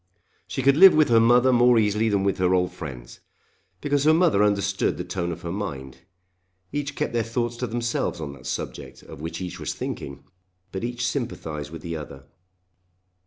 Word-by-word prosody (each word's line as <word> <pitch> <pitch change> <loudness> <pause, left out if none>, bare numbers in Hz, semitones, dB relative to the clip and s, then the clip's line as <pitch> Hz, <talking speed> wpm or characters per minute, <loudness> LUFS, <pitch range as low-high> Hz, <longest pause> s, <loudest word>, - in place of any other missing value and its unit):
She 135 - -3
could 140 +2 +4
live 190 0 +9
with 155 -3 +4
her 115 -1 +6
mother 120 +3 +5
more 120 0 +5
easily 105 +1 +2
than 100 -2 +1
with 100 -1 0
her 90 0 +3
old 90 0 +1
friends, 65 -9 -9 0.6
because 145 -1 +1
her 155 +1 +6
mother 165 - +3
understood 100 -2 +1
the 90 - -3
tone 85 -1 -3
of 80 - -8
her 85 - -4
mind. 70 -10 -5 0.7
Each 145 0 -3
kept - - -2
their 120 - +1
thoughts 120 +1 -2
to 125 - -3
themselves 120 -6 -2
on 75 -3 -5
that 65 -2 -11
subject - - -6
of - - -11
which 80 +3 -5
each 90 -1 -6
was - - -4
thinking; 70 0 -6 0.5
but 95 - -5
each 120 +1 -2
sympathised 80 - -4
with 80 +1 -9
the 85 -2 -4
other. 70 -3 -9
105 Hz, 190 wpm, -24 LUFS, 85-120 Hz, 0.7 s, live